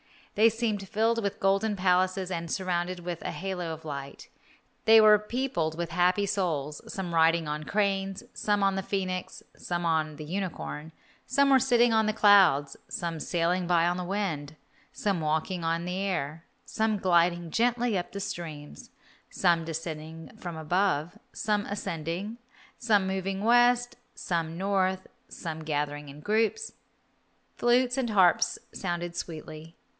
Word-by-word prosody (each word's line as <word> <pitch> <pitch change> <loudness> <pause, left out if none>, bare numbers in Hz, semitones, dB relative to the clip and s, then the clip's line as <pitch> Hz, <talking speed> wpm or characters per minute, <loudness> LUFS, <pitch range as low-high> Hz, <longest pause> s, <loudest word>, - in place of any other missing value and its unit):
They 220 +2 +5
seemed 215 -3 -2
filled 225 +2 +1
with 200 -2 -3
golden 195 +2 +2
palaces 185 0 +1
and 170 -1 -3
surrounded 180 -1 -2
with 175 -1 -5
a - - -4
halo 180 -3 -4
of 160 0 -8
light. 140 -2 -7 0.6
They 225 0 +8
were 215 -1 +7
peopled 210 -8 -2
with 170 -1 -3
happy 180 +4 +2
souls, 155 -7 -2
some 185 -3 -4
riding 165 0 +3
on 150 +1 -4
cranes, 195 0 -1
some 205 -1 0
on 195 0 +3
the 195 - -1
phoenix, 185 -2 -3
some 175 -1 -3
on 155 -2 0
the 155 - -8
unicorn; 165 -2 -5 0.3
some 280 +1 +3
were 265 - +7
sitting 240 -2 +3
on 220 -1 +3
the 215 - +1
clouds, 190 -10 +5
some 170 -2 -3
sailing 175 +2 0
by 170 -1 +3
on 175 +1 +1
the 180 - -4
wind, 170 -7 -3 0.4
some 200 -4 -1
walking 160 +3 -1
on 165 +1 -1
the 180 +1 -3
air, 170 -5 -3 0.2
some 220 -1 0
gliding 175 -2 +2
gently 240 +1 +1
up 180 -1 -3
the 200 - -5
streams, 165 -7 -7 0.4
some 170 -3 +2
descending 160 0 -6
from 175 -2 -6
above, 175 +2 0
some 210 -1 0
ascending, 190 +2 -4 0.4
some 210 -5 +3
moving 190 +1 -2
west, 245 +1 +4 0.2
some 165 -2 -2
north, 190 -1 0 0.2
some 160 -2 -6
gathering 145 -1 -3
in 145 +2 -11
groups. 225 - 0 0.9
Flutes 245 +1 +3
and 245 -4 0
harps 185 -4 +4 0.2
sounded 175 -2 -3
sweetly. 160 -1 -7
185 Hz, 150 wpm, -28 LUFS, 165-205 Hz, 0.9 s, They